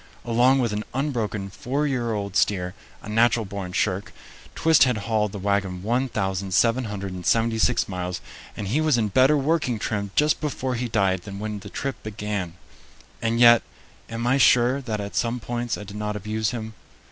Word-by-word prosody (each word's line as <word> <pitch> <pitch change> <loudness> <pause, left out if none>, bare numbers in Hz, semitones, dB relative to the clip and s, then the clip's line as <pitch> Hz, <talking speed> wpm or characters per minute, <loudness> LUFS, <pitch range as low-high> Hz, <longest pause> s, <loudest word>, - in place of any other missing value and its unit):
Along 120 +3 +4
with 120 -5 0
an 105 +1 -2
unbroken 110 -8 -2
four 140 +9 -2
year 125 -5 -1
old 100 -1 -4
steer, 90 -4 +1 0.3
a - - -9
natural 115 +1 +3
born 95 -2 -6
shirk, 95 +1 -1 0.4
Twist 160 -2 +5
had 125 -3 +1
hauled 110 -3 +1
the 100 - -6
wagon 100 -2 -1
1776 110 -1 0
miles, 90 -1 -4 0.4
and 100 - -4
he 145 +9 +1
was 155 -5 +3
in 110 -3 +1
better 130 +8 +4
working 140 -4 +1
trim 105 -1 -2
just 150 0 +3
before 130 -4 -2
he 125 0 -2
died 95 -4 +1
than 100 +1 -8
when 105 0 -4
the 100 - -10
trip 135 +5 -4
began. 105 -5 -4 0.7
And 115 0 0
yet, 120 -1 +8 0.5
am 115 +1 -4
I 130 +3 +3
sure 125 +2 +4
that 110 -5 -3
at 100 0 -6
some 120 +1 0
points 120 +1 -3
I - - -7
did 105 0 -9
not 105 0 -3
abuse 110 +2 -2
him? 110 -2 -5
110 Hz, 170 wpm, -24 LUFS, 100-125 Hz, 0.7 s, yet